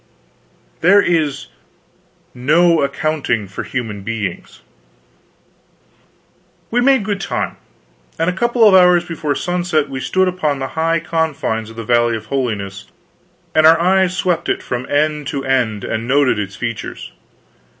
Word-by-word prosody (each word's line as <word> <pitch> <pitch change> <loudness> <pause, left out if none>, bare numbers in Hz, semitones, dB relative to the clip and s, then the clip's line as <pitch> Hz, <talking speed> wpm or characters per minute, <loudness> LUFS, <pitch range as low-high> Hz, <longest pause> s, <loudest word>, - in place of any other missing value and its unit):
There 190 +5 +5
is 155 -7 0 0.9
no 160 +6 +3
accounting 140 -7 -1
for 95 - -6
human 110 -5 -5
beings. 105 -3 -5 2.1
We 245 +2 +2
made 265 -3 +3
good 200 -1 -3
time; - - -3 0.6
and 165 0 0
a 180 - +1
couple 235 +3 +3
of 200 - +5
hours 180 -2 +5
before 155 -4 -3
sunset 175 -4 -1
we 135 -1 -5
stood 185 +7 +1
upon 160 -6 -1
the 135 -1 -4
high 165 +3 0
confines 155 -9 -2
of 115 - -12
the 115 - -6
Valley 120 0 +2
of 110 - -11
Holiness, 100 -7 -3 0.7
and 155 0 +5
our 165 0 +6
eyes 185 +1 +2
swept 175 -2 -1
it - - -1
from 125 0 -4
end 150 0 0
to 140 -3 -4
end 120 -6 0
and 110 +1 -3
noted 135 -4 +2
its 100 -2 -5
features. 115 +2 -6
150 Hz, 140 wpm, -17 LUFS, 120-175 Hz, 2.1 s, our